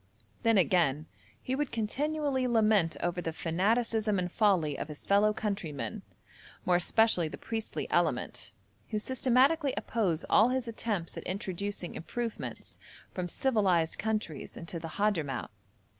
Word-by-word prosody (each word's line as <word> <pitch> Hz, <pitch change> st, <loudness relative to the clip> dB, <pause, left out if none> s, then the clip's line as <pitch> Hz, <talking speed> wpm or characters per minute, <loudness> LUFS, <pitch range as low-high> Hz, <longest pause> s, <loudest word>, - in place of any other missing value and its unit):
Then 225 Hz, -2 st, +4 dB
again, 165 Hz, -5 st, +3 dB, 0.3 s
he 255 Hz, -, -4 dB
would 290 Hz, 0 st, -1 dB
continually 275 Hz, +4 st, 0 dB
lament 215 Hz, -7 st, +3 dB
over 175 Hz, 0 st, -1 dB
the 165 Hz, -, -2 dB
fanaticism 210 Hz, +6 st, +1 dB
and 180 Hz, -1 st, -1 dB
folly 180 Hz, -10 st, +2 dB
of -, -, -4 dB
his 150 Hz, -2 st, -9 dB
fellow 205 Hz, +2 st, +4 dB
countrymen, 205 Hz, -2 st, -3 dB, 0.6 s
more 180 Hz, -1 st, +4 dB
especially 180 Hz, -2 st, +3 dB
the -, -, -7 dB
priestly 225 Hz, -1 st, -4 dB
element, -, -, 0 dB, 0.4 s
who 215 Hz, -, -1 dB
systematically 260 Hz, +5 st, +2 dB
oppose 185 Hz, -8 st, 0 dB
all 220 Hz, +3 st, +5 dB
his 255 Hz, -1 st, -1 dB
attempts 215 Hz, -6 st, -3 dB
at -, -, -5 dB
introducing 190 Hz, -1 st, -3 dB
improvements 230 Hz, +6 st, -5 dB, 0.3 s
from 180 Hz, -1 st, -3 dB
civilised 190 Hz, -9 st, +2 dB
countries 215 Hz, -9 st, -3 dB
into 170 Hz, 0 st, -5 dB
the 165 Hz, -, -6 dB
Hadhramout. 165 Hz, -, 0 dB
210 Hz, 130 wpm, -30 LUFS, 175-230 Hz, 0.6 s, all